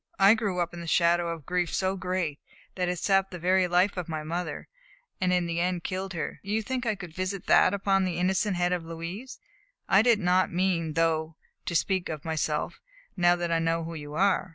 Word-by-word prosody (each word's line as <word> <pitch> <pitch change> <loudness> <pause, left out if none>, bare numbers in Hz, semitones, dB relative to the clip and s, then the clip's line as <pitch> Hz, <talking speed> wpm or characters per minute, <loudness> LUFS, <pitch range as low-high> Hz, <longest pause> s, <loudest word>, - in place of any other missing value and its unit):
I 195 +2 +7
grew 205 -5 -1
up 175 0 -1
in 170 - -7
the 170 - -7
shadow 170 +1 +3
of 165 -1 -4
a - - -27
grief 180 +2 -1
so 190 0 0
great 180 -5 -2 0.3
that 180 -1 -1
it 180 - -1
sapped 195 +1 +2
the 180 - -7
very 180 +2 +2
life 180 +3 +2
of 180 -2 -4
my 155 -1 -3
mother, 170 +3 -4 0.5
and 185 -1 +2
in 180 -1 +2
the 170 0 -2
end 180 0 -1
killed 190 0 -4
her. 165 - -4
Do 200 - -10
you 220 +1 0
think 255 +1 -3
I 215 - +1
could 180 -4 -9
visit 185 +1 -3
that - - +5
upon 195 -1 +1
the 185 -2 -2
innocent 185 +2 +1
head 175 0 +1
of 175 -2 -2
Louise? 170 +10 -7 0.5
I 195 +1 +5
did 235 -1 +4
not 185 -1 +2
mean, 170 -3 0
though, 160 0 0 0.3
to 170 - -2
speak 185 +1 +1
of 155 -3 -6
myself, 155 -1 -2 0.3
now 175 -1 +4
that 175 -1 -3
I 165 - +2
know 165 0 0
who 165 +1 -6
you 150 -2 -7
are. 190 +1 +2
180 Hz, 225 wpm, -27 LUFS, 165-190 Hz, 0.5 s, I